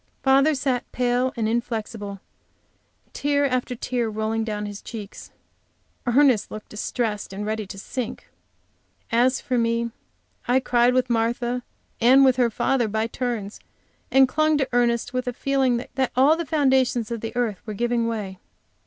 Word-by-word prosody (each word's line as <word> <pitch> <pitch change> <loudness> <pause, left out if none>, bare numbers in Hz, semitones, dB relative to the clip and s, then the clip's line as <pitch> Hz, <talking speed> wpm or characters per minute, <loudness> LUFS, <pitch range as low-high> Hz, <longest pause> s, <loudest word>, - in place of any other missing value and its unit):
Father 275 +3 +4
sat 260 -2 -1
pale 250 +1 +1
and 220 -2 0
inflexible; 220 -3 -3 0.9
tear 285 0 +1
after 255 -2 -1
tear 240 -1 -2
rolling 220 +1 -1
down 210 -1 -3
his 205 -1 -7
cheeks. 210 -4 -9 0.8
Ernest 250 -2 +4
looked 215 - -9
distressed 210 -1 -3
and 200 +2 -5
ready 215 -1 -3
to 195 - -8
sink. 240 +4 -5 0.8
As 245 +3 +3
for 250 -1 -1
me 230 0 0 0.6
I 250 +2 +4
cried 245 -1 +2
with 255 -1 +1
Martha, 240 +2 0 0.4
and 260 +3 +6
with 260 -1 +4
her 245 -2 +3
father 240 +1 +1
by 220 +1 -1
turns, 230 -3 -4 0.5
and 270 0 +6
clung 310 +3 +2
to 270 -3 0
Ernest 240 0 +1
with 255 0 -2
a 250 - -1
feeling 265 -1 +1 0.2
that 265 -1 0
all 275 +5 +5
the 335 -1 -4
foundations 260 -6 +2
of 230 -2 -3
the 225 +1 -5
earth 230 -6 -1
were 215 - -4
giving 235 +1 0
way. 205 -5 -4
240 Hz, 155 wpm, -24 LUFS, 220-260 Hz, 0.9 s, and